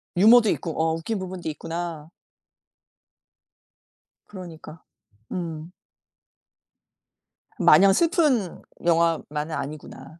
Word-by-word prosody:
유머도 220 +3 +6
있고. 165 - -3
어 160 0 +1
웃긴 195 +6 -4
부분도 185 -3 -6
있구나. 165 0 -6 2.2
그러니까. 170 -4 -11 0.5
음. 165 -1 -5 1.9
마냥 195 0 +6
슬픈 300 - +1 0.2
영화만은 165 -2 0
아니구나. 145 +1 -8
170 Hz, 185 characters per minute, -24 LUFS, 160-190 Hz, 2.2 s, 유머도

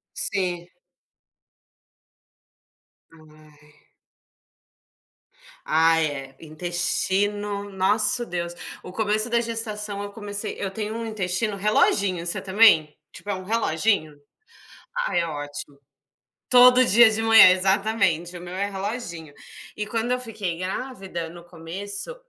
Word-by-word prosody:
Sim. 185 - -2 2.4
Ai. 150 -2 -21 1.8
Ai 160 0 +3
é, 135 -2 -7
intestino, 200 +5 -2
nosso 210 +5 +1
Deus, 170 -2 -4 0.3
o - - -10
começo 215 +3 -1
da 235 0 +2
gestação 215 -3 -4
eu 205 - -6
comecei 205 0 -5
eu 195 -1 -4
tenho 215 +2 -4
um 230 0 -4
intestino 210 0 -2
reloginho, 195 -3 +1
você 185 +3 -1
também? 190 -6 +4 0.2
Tipo 205 - -8
é - - 0
um 185 0 -7
reloginho? 190 -6 0 0.9
Ai - - +1
é 170 - -1
ótimo. 145 -2 -7 0.7
Todo 250 0 +7
dia 230 +1 +6
de 220 +1 -1
manhã 225 -4 +8
exatamente, 185 -2 +1
o - - -10
meu 175 +1 -8
é 200 +2 -2
reloginho. 190 - -6 0.4
E 210 - -3
quando 230 +3 -2
eu 250 - +1
fiquei 210 -8 -5
grávida 190 -3 -5
no 170 +1 -12
começo, 185 - -6
195 Hz, 115 wpm, -24 LUFS, 170-215 Hz, 2.4 s, manhã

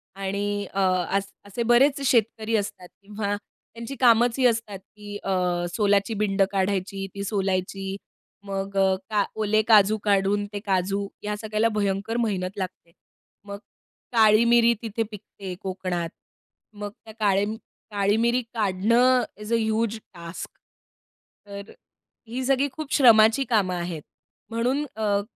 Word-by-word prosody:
आणि 200 +1 -2
अ, 195 - 0 0.4
अस 200 0 -3 0.2
असे 205 +4 -3
बरेच 270 +5 +4
शेतकरी 225 -2 +1
असतात 200 -3 -5
किंवा 205 0 -3 0.4
त्यांची 235 +4 -7
कामंचं 240 +1 +4
ही 250 - +6
असतात 225 -4 -2
की 205 +1 -10
अ, 180 -2 0
सोलाची 205 0 +2
बिंड 195 -1 0
काढायची, 195 0 -1
ती 200 - -4
सोलायची, 195 -1 -2 0.5
मग 195 0 -4
अ, 190 -1 +4
का 210 -2 +2
ओले 215 0 +2
काजू 215 -1 +6
काढून 205 0 +2
ते 205 - -3
काजू 195 +1 0 0.2
या 210 0 -2
सगळ्याला 215 +1 +1
भयंकर 200 +3 -1
मेहनत 200 -4 -2
लागते. 185 -3 -6 0.5
मग 200 0 -6 0.6
काळी 220 0 +5
मिरी 235 0 +5
तिथे 225 -1 -2
पिकते 200 -2 -8
कोकणात. 185 -3 -3 0.6
मग 205 0 -6
त्या 220 - -11
काळे 200 -1 +2 0.5
काळी 205 +1 +1
मिरी 235 +2 +2
काढणं 230 +5 +3 0.2
इज 210 +2 -4
अ - - +5
ह्यूज 220 0 0 0.2
टास्क. 170 -1 -8 1.0
तर 200 +1 -8
अ, - - -15 0.5
ही 245 +3 -4
सगळी 270 +1 +2
खूप 300 +1 -6
श्रमाची 225 -1 +6
कामं 200 -6 +2
आहेत. 170 -2 -4 0.5
म्हणून 250 +6 0
अ, 205 -2 +1
205 Hz, 135 wpm, -25 LUFS, 195-225 Hz, 1.0 s, ही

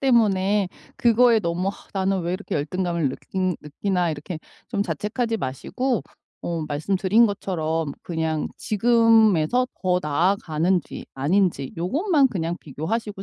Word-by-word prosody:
때문에 205 -6 +3 0.3
그거에 235 0 +5
너무 180 0 -1
'아 - - -1 0.2
나는 195 -1 0
왜 175 +1 -2
이렇게 195 -1 -3
열등감을 170 0 -1
느끼 185 +6 -2
느끼나.' 175 +4 -1
이렇게 155 +2 -6 0.3
좀 200 - 0
자책하지 210 - -2
마시고 215 - -2 0.4
어 170 -2 -2
말씀드린 190 +9 +2
것처럼 165 -6 -2
그냥 160 -2 -2
지금에서 225 -2 +4 0.2
더 180 -1 +2
나아가는지 170 +2 0
아닌지 150 0 +1
요것만 285 - +2
그냥 170 -6 -2
비교하시고 195 - -4
185 Hz, 310 characters per minute, -23 LUFS, 160-215 Hz, 0.4 s, 그거에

